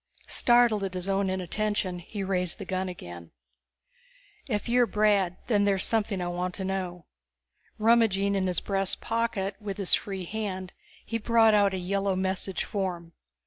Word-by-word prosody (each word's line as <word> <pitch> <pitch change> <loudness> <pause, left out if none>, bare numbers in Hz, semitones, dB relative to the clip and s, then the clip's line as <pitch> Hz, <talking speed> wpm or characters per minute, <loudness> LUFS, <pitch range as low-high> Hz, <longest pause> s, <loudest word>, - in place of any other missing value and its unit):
Startled 240 -4 +3
at 190 -1 -3
his 180 +1 -3
own 195 0 +1
inattention, 185 0 -1
he 195 +4 -6
raised 180 -3 0
the - - -7
gun 185 0 -2
again. 85 - -9 1.2
"If 210 -1 -1
you're 245 0 +4
Brandd, 205 -4 +2
there's 200 -4 +2
something 215 -3 0
I - - -2
want 180 +1 -3
to 190 - -3
know." 180 -3 -3 0.7
Rummaging 215 -3 +3
in 190 -1 +1
his 180 - 0
breast 195 -1 0
pocket 225 -4 -2
with 200 -2 -5
his 195 -3 0
free 195 -3 0
hand, 190 -2 -4 0.3
he 230 - -2
brought 225 0 +4
out 200 -2 +4
a - - -2
yellow 195 +1 -1
message 190 0 -2
form. 180 -5 -4
195 Hz, 155 wpm, -27 LUFS, 185-210 Hz, 1.2 s, you're